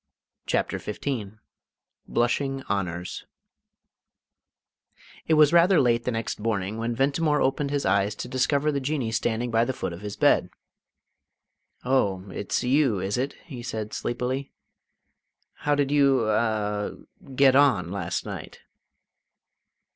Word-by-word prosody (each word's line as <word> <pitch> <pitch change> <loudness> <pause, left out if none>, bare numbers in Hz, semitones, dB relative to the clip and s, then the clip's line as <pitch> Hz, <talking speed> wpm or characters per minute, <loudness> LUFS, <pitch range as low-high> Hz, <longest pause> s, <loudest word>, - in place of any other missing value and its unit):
CHAPTER - - 0
XV 105 -2 -4 0.7
BLUSHING 135 +3 0
HONOURS 90 -3 -3 2.0
It 160 - +4
was 155 0 +5
rather 175 +1 +6
late 120 -3 +2
the 125 - 0
next 115 -2 -3
morning 105 -1 -2
when 115 +1 -2
Ventimore 145 +4 +1
opened 135 +2 0
his 145 0 -1
eyes, 100 +2 +2
to - - -6
discover 140 +3 +1
the 140 - -1
Jinnee 135 -4 -2
standing 115 +1 -1
by 115 0 +3
the 130 +2 -1
foot 85 - -4
of 85 - -9
his 105 -1 -6
bed. - - +3 1.4
"Oh, 100 -8 +1
it's 100 +6 -2
you, 130 -4 +2
is 95 +2 -2
it?" 130 +3 -1
he 130 -7 -8
said 110 -3 -5
sleepily. 125 +3 -3 1.0
"How 145 0 0
did 145 -1 0
you 135 -5 +3
a 105 -2 0 0.4
get 135 0 +5
on 120 -12 +4
last 90 -3 -3
night?" - - -8
120 Hz, 130 wpm, -25 LUFS, 105-140 Hz, 2.0 s, rather